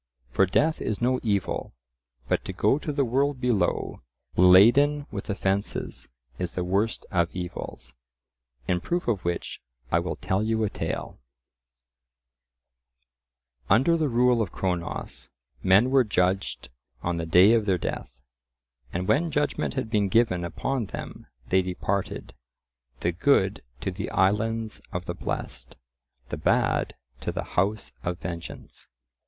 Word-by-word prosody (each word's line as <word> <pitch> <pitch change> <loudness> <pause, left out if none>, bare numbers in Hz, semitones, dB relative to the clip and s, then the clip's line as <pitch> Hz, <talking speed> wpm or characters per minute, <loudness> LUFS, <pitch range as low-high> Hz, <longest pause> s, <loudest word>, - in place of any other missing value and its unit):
For 95 +8 +3
death 155 - +2
is 105 - -2
no 125 +1 +2
evil, 100 - -1 0.5
but - - 0
to - - -4
go 135 - +2
to 150 - -3
the 140 -1 +1
world 135 +3 +1
below 120 -8 0 0.3
laden 120 +12 +6
with - - -6
offences 100 0 -2 0.3
is 90 -2 -3
the 90 - -1
worst 100 +5 0
of 85 -2 +2
evils. 90 -8 -6 0.7
In 90 -1 +1
proof 175 - -2
of 105 -6 0
which 85 0 -3 0.3
I - - +4
will - - -3
tell 95 +2 -1
you 110 0 0
a 105 - 0
tale:— - - -4 2.5
Under 130 - +5
the 155 -3 +1
rule 125 0 +3
of 100 - -2
Cronos, 90 -3 -3 0.3
men 100 - +5
were 135 -1 +5
judged 95 -2 0 0.3
on 85 0 -1
the 85 0 -3
day 90 +6 +7
of 110 -3 +2
their 95 -2 +3
death, 65 -5 -5 0.7
and 90 +2 -3
when 165 +3 +2
judgment 150 -2 -1
had 125 -5 -3
been 105 -3 +2
given 95 -5 +3
upon 120 +7 -2
them - - -8 0.2
they 95 0 +4
departed—the 65 -8 -5
good 95 +1 +2 0.2
to - - -2
the - - -5
islands 110 +3 0
of 90 -1 -4
the - - -3
blest, - - -5 0.5
the - - -3
bad - - +1 0.2
to - - -3
the - - -3
house 100 +4 0
of 85 0 -2
vengeance. 85 -1 -8
100 Hz, 140 wpm, -26 LUFS, 90-120 Hz, 2.5 s, day